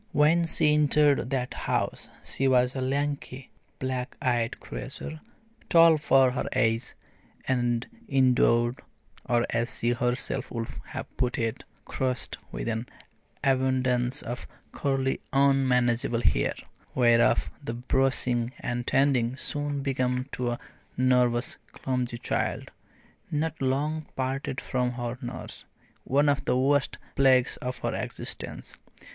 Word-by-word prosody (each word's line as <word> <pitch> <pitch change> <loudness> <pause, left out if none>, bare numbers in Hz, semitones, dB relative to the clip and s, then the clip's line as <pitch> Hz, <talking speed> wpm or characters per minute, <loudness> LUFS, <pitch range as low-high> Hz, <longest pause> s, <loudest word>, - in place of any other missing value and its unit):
When 160 +3 +4
she 150 -2 +4
entered 150 -3 +4
that 130 -2 -2
house - - -2
she 135 - 0
was 125 -1 +3
a 130 - -2
lanky, 140 0 -2 0.3
black 130 -1 -3
eyed 120 -2 0
creature, 145 +4 -7 0.5
tall 165 -1 +7
for 135 -3 +4
her 125 - -2
age, 115 -2 +1 0.5
and 120 -2 +1 0.2
endowed 125 -2 +3 0.5
or, 120 -1 +3
as 115 +1 0
she 120 - +1
herself 125 +1 -1
would 115 -1 -3 0.2
have - - -8
put 125 -1 0
it, 115 -1 -2 0.2
cursed 130 -1 -2
with - - -4
an 115 +2 -2 0.6
abundance 130 -2 +1
of 120 +1 -5 0.2
curly 135 -1 -1
unmanageable 125 -4 +3
hair, - - +2 0.4
whereof 120 -2 +4
the 115 -4 -4
brushing 125 -1 +1
and 120 0 -3
tending 130 -3 +2
soon 145 -1 -2
became 130 -2 0
to 125 -1 -2
a 120 - -3 0.4
nervous 125 -1 +2 0.2
clumsy 125 -2 -2
child, - - -2 0.6
not 155 0 -2
long 150 +4 0
parted 135 0 -2
from 125 -1 -1
her 120 0 -4
nurse, 125 0 -6 0.4
one 145 +3 +3
of 140 -1 +1
the 125 - +2
worst 140 +2 +2 0.2
plagues 130 -2 +4
of 125 0 -4
her - - -2
existence. - - -6
130 Hz, 125 wpm, -27 LUFS, 120-135 Hz, 0.6 s, tall